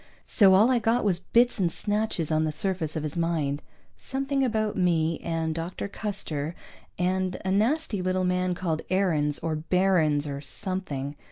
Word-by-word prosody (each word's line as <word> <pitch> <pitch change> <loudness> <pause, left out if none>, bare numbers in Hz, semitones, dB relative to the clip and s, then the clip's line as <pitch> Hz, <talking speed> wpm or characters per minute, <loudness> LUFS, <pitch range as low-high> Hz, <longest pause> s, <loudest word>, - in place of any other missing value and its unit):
So 195 -4 +5
all 220 +6 +5
I 250 - +3
got 230 +2 +1
was 185 -4 +2
bits 235 +5 +2
and 175 -3 +2
snatches 205 -6 -1
on 155 0 +2
the 155 - 0
surface 180 -3 -2
of 155 - -2
his 155 +1 -3
mind. 160 -4 0 0.4
Something 275 0 -1
about 220 -4 0
me, 165 -3 +1
and 165 -1 -2
Dr. 165 +4 -4
Custer; 175 -7 -4 0.4
and 185 +1 0
a 190 - +1
nasty 220 +1 +1
little 185 0 0
man 180 0 +1
called 165 -3 -2
Aarons 160 -6 +1
or 160 -1 -1
Barrons 160 -3 +2
or 140 -1 -4
something. 150 -4 -4
180 Hz, 165 wpm, -27 LUFS, 160-200 Hz, 0.4 s, So